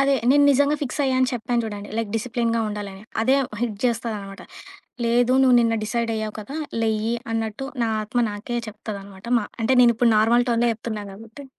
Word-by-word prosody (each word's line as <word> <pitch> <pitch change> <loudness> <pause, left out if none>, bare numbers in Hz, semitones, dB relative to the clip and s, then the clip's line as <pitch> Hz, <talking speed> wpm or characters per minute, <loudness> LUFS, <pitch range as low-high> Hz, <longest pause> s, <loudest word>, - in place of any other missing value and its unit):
అదే 275 0 +3 0.2
నేను 285 +1 +5
నిజంగా 285 +2 +3
ఫిక్స్ 280 +2 -3
అయ్యాను 260 -1 +1
అని 255 - +3
చెప్పాను 240 0 -1
జూడండి 205 -1 -6
లైక్ 225 -3 -2
డిసిప్లేన్‍గా 230 0 -1
ఉండాలని 200 -2 -6 0.2
అదే 260 +4 +3 0.3
హిట్ 225 -4 -2
జేస్తాదనమాట. 220 -4 -2 0.7
లేదు 240 +2 +3
నువ్వు 255 -2 +5
నిన్న 230 -1 +2
డిసైడ్ 230 +1 -1
అయ్యావు 215 -1 -4
కదా! 215 +7 -8 0.3
లేయ్యి 220 +1 0 0.2
అన్నట్టు 225 +3 -3 0.2
నా 230 - +1
ఆత్మ 215 +3 -2
నాకే 215 +4 -4
చెప్తదనమాట. 200 -2 -8
మా 210 - -4 0.2
అంటే 240 +4 +2
నేను 235 -1 +6
ఇప్పుడు 235 0 +3
నార్మల్ 235 +3 +4
టోన్‍లో 235 0 +2
జెప్తున్నా 220 -1 -5
గాబట్టి 225 +7 -12
230 Hz, 175 wpm, -23 LUFS, 215-245 Hz, 0.7 s, నేను